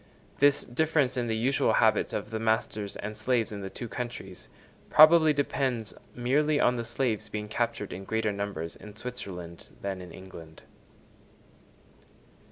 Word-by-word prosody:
This 145 0 +4
difference 145 0 +1
in 120 -2 -1
the 110 -1 0
usual 130 +4 +2
habits - - +3
of 105 - -4
the 110 - -2
masters 110 -2 -1
and 105 +1 -5
slaves 115 +1 0
in 100 -1 -5
the 95 - -5
two 120 - -7
countries, 115 -5 -7 0.4
probably 155 0 +8
depends 135 -6 -1 0.2
merely 145 +5 +2
on 125 - +3
the 120 - -2
slaves 115 -3 -1
being 105 0 -4
captured 110 -2 -2
in 95 +2 -7
greater 110 0 0
numbers 100 -5 -4
in 105 -1 -12
Switzerland 95 -8 -7
than 95 -2 -3
in 90 -1 -10
England. 85 -4 -12
110 Hz, 150 wpm, -28 LUFS, 100-125 Hz, 0.4 s, probably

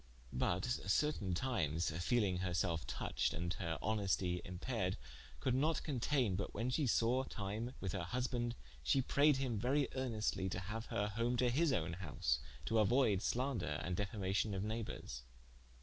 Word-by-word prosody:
But 90 +2 +1 0.2
certaine 100 - +1
times 85 - 0
feeling 105 -5 +2
her 90 -1 -1
selfe 80 -2 0
touched, 65 - -1
and 85 +1 -1
her 85 -3 -1
honestie 95 -4 +1
appaired, 90 +1 -2 0.4
could 125 - +1
not 150 +5 +2
conteine 130 - +1
but 100 - -3
when 115 +4 0
she 140 +1 +2
sawe 120 +3 +3
time 110 +2 -4
with 95 - -2
her 90 -2 -2
husband, 120 +2 -1 0.3
she 135 -2 +3
prayed 145 +2 +4
him 125 -5 -1
verie 135 +5 +2
earnestlie 110 -7 0
to 90 - -2
haue 105 +5 -5
her 105 +1 0
home 115 +4 0
to 120 0 +3
his 155 +4 +3
own 85 -8 0
house, 70 -8 -1 0.3
to 115 - +2
auoyde 110 -2 +4
slaunder 115 - 0
and 90 0 -1
defamacion 100 0 0
of 95 - -1
neighbours. 105 - -4
105 Hz, 160 wpm, -38 LUFS, 90-125 Hz, 0.4 s, prayed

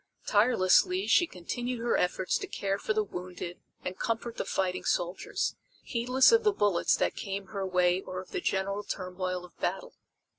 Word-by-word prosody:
Tirelessly 235 - +4
she 345 - +4
continued 240 - -4
her 235 +1 +1
efforts 180 +1 +1
to - - -5
care 195 0 -2
for - - -2
the 215 0 +2
wounded 180 -2 -7 0.3
and 185 0 -4
comfort 230 0 -2
the - - -2
fighting 185 -1 -1
soldiers, 175 +2 -1 0.3
heedless 250 - +4
of 460 0 +5
the 425 - +4
bullets 205 - +2
that - - 0
came 195 -1 -5
her 195 -2 -3
way 180 0 +2
or 185 -1 -6
of 185 - -10
the - - -2
general 195 +1 -1
turmoil 185 -2 -4
of 180 - -18
battle. - - -2
195 Hz, 175 wpm, -29 LUFS, 185-235 Hz, 0.3 s, of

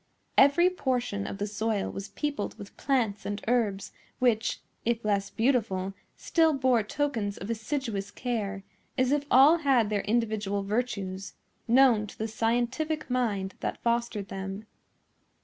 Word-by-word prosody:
Every 285 +6 +6
portion 245 - -1
of - - -5
the 205 - -2
soil 215 0 -1
was 195 +1 -6
peopled 290 -8 -3
with 200 - -11
plants 230 -8 0
and 205 0 -3
herbs, 215 -5 0 0.3
which, 235 -3 +1 0.2
if 235 -1 -1
less 200 -1 +1
beautiful, 220 -6 0 0.2
still 325 -2 +3
bore 260 -4 +3
tokens 215 -3 -2
of 200 - -5
assiduous 220 -3 -3
care, 205 -3 -3 0.3
as 255 0 +2
if 290 0 +1
all 280 +6 +7
had 260 -9 +2
their 205 -1 +1
individual 210 -2 0
virtues, 200 -3 -3 0.3
known 235 -3 +5
to - - -12
the 220 - -2
scientific 245 +7 -1
mind 205 -6 0
that - - -4
fostered 235 -4 -1
them. 195 +2 -5
225 Hz, 140 wpm, -28 LUFS, 200-255 Hz, 0.3 s, all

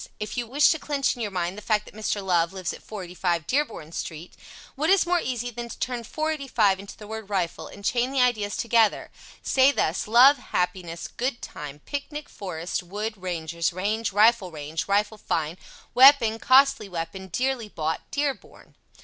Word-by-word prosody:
If 210 - -5
you 240 -2 -2
wish 280 +5 +4
to 320 - -1
clinch 285 -2 0
in 245 - -8
your 215 - -1
mind 180 -1 -2
the 210 - -8
fact 210 -1 0
that - - -14
Mr. 210 -2 -3
Love 175 -1 +2
lives 185 -2 -3
at - - -11
485 180 -4 -3
Dearborn 240 - -2
Street, 165 0 -6 0.4
what 305 +4 -1
is 390 -1 +5
more 350 0 +2
easy 245 -4 -3
than 235 0 -6
to - - -8
turn 245 -2 -3
485 270 -9 0
into 200 0 -10
the 210 - -11
word 220 -1 -7
"rifle" 180 -4 -2
and 200 - -11
chain 245 +3 +1
the 275 - 0
ideas 220 -5 +1
together, 230 -2 +2 0.3
say 265 +1 +4
thus: 175 - -1
"Love 255 +5 +7
happiness 180 -4 -3
good 250 0 -3
time 145 0 -8
picnic 295 +1 -5
forest 180 -3 -4
wood 205 +5 -4
rangers 170 -3 -2
range 205 +5 -1
rifle 210 -1 +4
range 155 0 -5
rifle 210 +2 +1
fine 160 -4 -2 0.4
weapon 250 -4 +7
costly 260 -5 +4
weapon 180 +2 -5
dearly 250 +3 -1
bought 160 -3 -2
Dearborn." 285 -1 -4
210 Hz, 175 wpm, -25 LUFS, 180-250 Hz, 0.4 s, Love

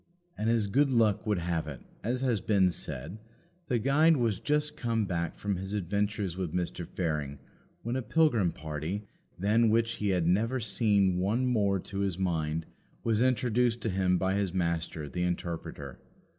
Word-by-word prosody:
And, 110 +2 -1
as 115 -2 +2
good 135 +7 +2
luck 110 -4 +2
would 105 -2 +2
have 85 -2 -1
it, 70 -4 -6 0.2
as 125 +3 -1
has 120 -7 +1
been 95 -4 +3
said, 80 +5 -5 0.5
the 125 - +1
guide 150 +7 +4
was 115 -6 +1
just 150 0 0
come 115 -5 0
back 85 -3 -2
from 100 -2 -2
his 95 +3 -4
adventures 100 -1 -1
with 90 -3 -3
Mr. 90 -1 -2
Fearing 75 -5 -2 0.5
when 120 +2 -2
a 130 - 0
pilgrim 120 - +2
party, 80 +6 -4 0.3
than 110 +5 +3
which 115 +1 +1
he 105 - -1
had 90 -3 +1
never 110 +9 +2
seen 100 -4 +2
one 110 +7 +1
more 100 -6 +2
to 100 +2 -6
his 100 -3 0
mind, 80 -4 -1 0.4
was 115 -1 +1
introduced 125 -2 +2
to 110 - -1
him 90 -1 +2
by 95 +1 +1
his 100 -2 -1
Master, 85 -3 -1
the 90 +5 -4
Interpreter. 85 -6 -4
100 Hz, 170 wpm, -30 LUFS, 90-115 Hz, 0.5 s, guide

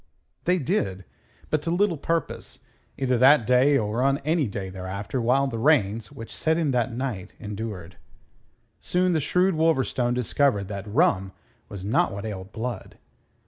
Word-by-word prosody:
They 180 +1 +3
did; 100 - -1 0.5
but 155 - +1
to 165 - -3
little 180 +1 +2
purpose, 165 +2 -3 0.3
either 130 -3 +1
that 135 -1 +6
day 130 +4 +4
or 110 +1 -1
on 135 +1 +3
any 155 -3 +2
day 100 -2 -5
thereafter 95 +6 -4
while 130 +4 +3
the 120 -4 -3
rains 110 -6 +2
which 115 - -9
set 160 0 +1
in 160 -4 +1
that 125 0 0
night 115 -6 -4
endured. 105 -4 -6 0.8
Soon 180 0 +1
the 160 - +2
shrewd 180 +6 +2
Wolverstone 135 -6 +1
discovered 125 -4 +1
that 100 0 -6
rum 100 - +2 0.4
was 100 -2 -7
not 105 - +2
what 100 +2 -6
ailed 95 -2 -6
Blood. 115 -2 -5
125 Hz, 155 wpm, -25 LUFS, 105-150 Hz, 0.8 s, that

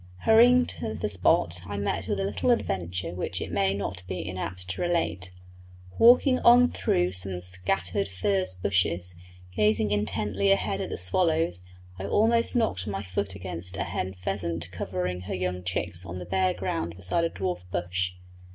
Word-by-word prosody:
Hurrying 245 +3 +6
to 110 - -5
the - - -2
spot 90 -3 +2
I 100 0 -4
met 100 0 -2
with 100 - -1
a - - 0
little 100 - -1
adventure 90 - -1
which 90 0 -3
it - - -5
may 100 -1 +1
not 100 -2 -4
be 90 -1 -4
inapt 90 0 -5
to 95 - -3
relate. 95 - 0 0.7
Walking 250 +3 +6
on 245 +1 +7
through 90 +1 +1
some 90 0 -3
scattered 90 +1 -1
furze 95 0 0
bushes, 90 -1 0 0.4
gazing 105 0 +2
intently 105 -1 0
ahead 100 -1 +1
at - - -3
the - - -4
swallows, 125 - +1 0.4
I 95 - -4
almost 230 - +2
knocked 220 - 0
my 100 -1 -3
foot 95 +1 -3
against 90 -1 -6
a - - 0
hen 95 +1 -3
pheasant 85 -2 -3
covering 90 0 -3
her 90 - -4
young 90 0 -2
chicks 90 -1 -2
on 90 0 -7
the 90 - -6
bare 95 +1 +1
ground 85 -2 -3
beside 95 - 0
a 165 - +1
dwarf 90 - -3
bush. 90 +1 -1
95 Hz, 170 wpm, -27 LUFS, 90-100 Hz, 0.7 s, on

